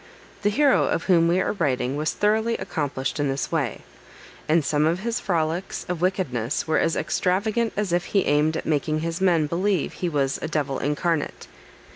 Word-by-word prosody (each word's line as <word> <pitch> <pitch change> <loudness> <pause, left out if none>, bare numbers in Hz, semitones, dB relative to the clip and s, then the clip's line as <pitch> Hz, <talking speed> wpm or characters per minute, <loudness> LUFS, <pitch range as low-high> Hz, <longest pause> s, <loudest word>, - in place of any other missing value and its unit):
The 205 - +2
hero 275 +5 +3
of - - -1
whom 170 -3 +4
we 175 +2 +2
are - - 0
writing 130 -8 0
was 155 +2 0
thoroughly 220 +2 +1
accomplished 135 -3 -3
in 145 -1 +1
this 135 +1 -2
way, 145 -9 -1 0.7
and 160 -1 +3
some 150 0 +2
of 170 +3 0
his 235 +2 -1
frolics 170 0 -2
of 175 -2 -3
wickedness 150 - -1
were 160 - +2
as 165 - +1
extravagant 215 +5 0
as 205 -4 -1
if 175 +1 +1
he 195 - +1
aimed 150 +2 +2
at - - -5
making 155 0 0
his 165 +2 -3
men 170 -5 +3
believe 180 +2 0
he 180 - -2
was 140 -3 0
a - - -2
devil 145 -3 -1
incarnate. 150 +2 -1
165 Hz, 185 wpm, -24 LUFS, 145-190 Hz, 0.7 s, whom